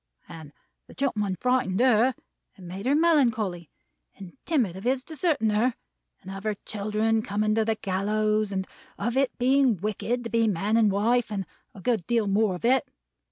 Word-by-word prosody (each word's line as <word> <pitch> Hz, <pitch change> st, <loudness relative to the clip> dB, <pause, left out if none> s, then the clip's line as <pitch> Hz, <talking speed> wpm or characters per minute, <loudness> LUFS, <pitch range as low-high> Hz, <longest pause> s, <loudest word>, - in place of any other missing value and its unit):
And 155 Hz, -3 st, -11 dB, 0.4 s
the -, -, -15 dB
gentleman 210 Hz, -8 st, -1 dB
frightened 250 Hz, -7 st, +1 dB
her, 250 Hz, 0 st, +4 dB, 0.4 s
and 185 Hz, -3 st, -12 dB
made 190 Hz, +6 st, -6 dB
her 280 Hz, -, +3 dB
melancholy, 235 Hz, -, +2 dB, 0.5 s
and 190 Hz, -3 st, -11 dB
timid 245 Hz, -, 0 dB
of 190 Hz, -, -9 dB
his 255 Hz, +1 st, 0 dB
deserting 310 Hz, -9 st, 0 dB
her, 230 Hz, +4 st, +1 dB, 0.5 s
and 190 Hz, -, -8 dB
of 195 Hz, 0 st, -7 dB
her 215 Hz, -1 st, -1 dB
children 215 Hz, +2 st, 0 dB
coming 215 Hz, +1 st, 0 dB
to 220 Hz, 0 st, +2 dB
the 220 Hz, 0 st, 0 dB
gallows, 215 Hz, +2 st, 0 dB
and 190 Hz, -1 st, -2 dB, 0.3 s
of 235 Hz, +4 st, -2 dB
its 270 Hz, -1 st, +1 dB
being 255 Hz, -2 st, +3 dB
wicked 215 Hz, +5 st, -2 dB
to 230 Hz, -, -6 dB
be 230 Hz, 0 st, +2 dB
man 205 Hz, +2 st, 0 dB
and 220 Hz, -3 st, +4 dB
wife, 230 Hz, +4 st, +1 dB
and 195 Hz, -2 st, -3 dB, 0.3 s
a 195 Hz, -, -11 dB
good 220 Hz, -6 st, -1 dB
deal 230 Hz, -2 st, +1 dB
more 200 Hz, -1 st, +1 dB
of 180 Hz, -, -6 dB
it. 255 Hz, 0 st, +2 dB
215 Hz, 180 wpm, -26 LUFS, 200-245 Hz, 0.5 s, her